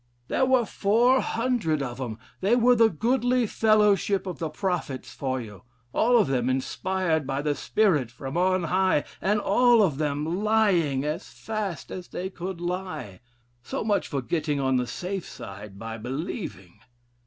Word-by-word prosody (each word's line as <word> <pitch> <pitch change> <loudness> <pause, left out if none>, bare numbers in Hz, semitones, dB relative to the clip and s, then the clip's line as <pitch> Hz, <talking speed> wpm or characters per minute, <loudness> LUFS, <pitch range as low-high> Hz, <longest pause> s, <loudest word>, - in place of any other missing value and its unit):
There 260 - +2
were 255 -2 +4
400 230 - +2
of 125 0 -5
'em; 115 -4 -4 0.2
they 200 +5 +3
were 245 +1 +5
'the 225 -1 +5
goodly 245 +5 +1
fellowship 210 -3 +3
of 180 -2 -5
the 160 - -2
prophets 155 -6 -3
for 130 -1 -2
you; 105 -4 -9 0.3
all 240 +2 +4
of 225 - +4
them 130 -2 0
inspired 160 +3 -1
by 135 +1 -2
the 150 -1 +1
spirit 155 - +1
from 135 +4 -7
on 185 +1 +2
high, 185 -2 +2 0.2
and 205 +2 +2
all 235 +2 +4
of 155 -7 0
them 155 +5 -1
lying 185 -11 +2
as 155 +5 -3
fast 210 -7 -5
as 180 -1 -6
they 190 +2 -5
could 185 -1 -6
lie.' 175 - -4 0.4
So - - -4
much 210 -2 +1
for 140 -3 -3
getting 150 0 -1
on 130 -1 +2
the 125 -1 -1
safe 185 +5 -4
side 100 0 -9
by 115 +1 -6
believing. 125 - -6
180 Hz, 160 wpm, -26 LUFS, 135-210 Hz, 0.4 s, were